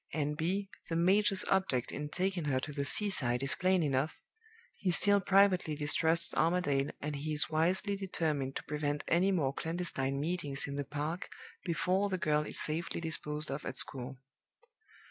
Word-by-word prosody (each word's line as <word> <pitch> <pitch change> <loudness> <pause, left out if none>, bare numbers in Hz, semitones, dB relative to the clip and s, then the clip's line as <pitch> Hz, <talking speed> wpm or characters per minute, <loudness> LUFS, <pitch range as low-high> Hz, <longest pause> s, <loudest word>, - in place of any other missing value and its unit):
(N.B. 160 +7 -1 0.2
The 165 - -2
major's 195 +3 +3
object 190 -11 +1
in 150 0 -5
taking 185 -1 -2
her 135 -3 +1
to 145 +2 -6
the 140 -1 -2
seaside 135 - 0
is 135 - +1
plain 185 -1 +1
enough. 140 +1 0 0.6
He 195 - -2
still 200 +3 +3
privately 190 -5 +3
distrusts 160 +3 +2
Armadale, 155 -5 +1
and 145 0 -4
he 155 +2 -3
is 150 +1 +6
wisely 180 +6 +1
determined 155 -8 -2
to - - -4
prevent 150 -1 -3
any 180 +4 +2
more 145 -8 0
clandestine 155 -6 -1
meetings 150 -3 -2
in 140 - -6
the 145 - -2
park 150 +5 -4 0.3
before 185 +4 0
the 190 - -1
girl 150 -3 0
is - - 0
safely 160 +3 -2
disposed 150 -2 0
of 140 +2 -4
at - - -6
school.) 130 -1 +1
155 Hz, 165 wpm, -32 LUFS, 145-185 Hz, 0.6 s, is